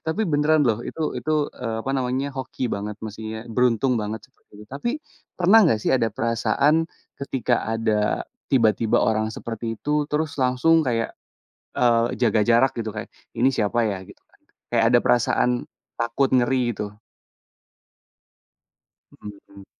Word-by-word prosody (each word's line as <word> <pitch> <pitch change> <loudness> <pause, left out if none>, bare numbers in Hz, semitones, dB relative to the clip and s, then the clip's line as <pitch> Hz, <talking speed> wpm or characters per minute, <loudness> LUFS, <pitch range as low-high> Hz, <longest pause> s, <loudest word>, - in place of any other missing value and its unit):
tapi 160 +7 0
beneran 150 -1 +3
loh, 115 -2 +2
itu 160 -2 -3
itu, 155 - -2 0.2
eee, 115 -3 -4
apa 135 - -2
namanya, 130 +1 -1
hoki 130 -1 -3
banget 105 +1 -5
maksudnya, 110 +1 -7
beruntung 125 +2 +2
banget, 105 +1 -4
seperti - - -40
itu. 105 - -11
Tapi, 140 - -3 0.5
pernah 185 +5 +6
nggak 150 - +3
sih - - 0
ada 115 -3 +2
perasaan, 120 +8 +1 0.4
ketika 125 -3 -1
ada, 110 -2 0 0.2
tiba-tiba 115 -4 +3
orang 110 0 +1
seperti 115 0 -5
itu, 150 0 0
terus 155 +1 -1
langsung 130 +6 +3
kayak, 115 -5 -1 0.6
eee, 120 -1 +2
jaga 115 -3 +2
jarak, 120 +3 +4
gitu? 115 -1 -3
Kayak, 105 - -6 0.3
"Ini 120 +3 +4
siapa 115 0 +1
ya?" 100 -3 -2
Gitu - - -16
kan, - - -31 0.3
kayak 115 -1 +3
ada 120 - +6
perasaan 120 0 +2 0.5
takut 115 +4 +1
ngeri, 130 0 +3
gitu? 105 -2 -5 2.2
Mhm 105 - -10 0.2
mhm. 100 -1 -15
120 Hz, 145 wpm, -23 LUFS, 110-135 Hz, 2.2 s, pernah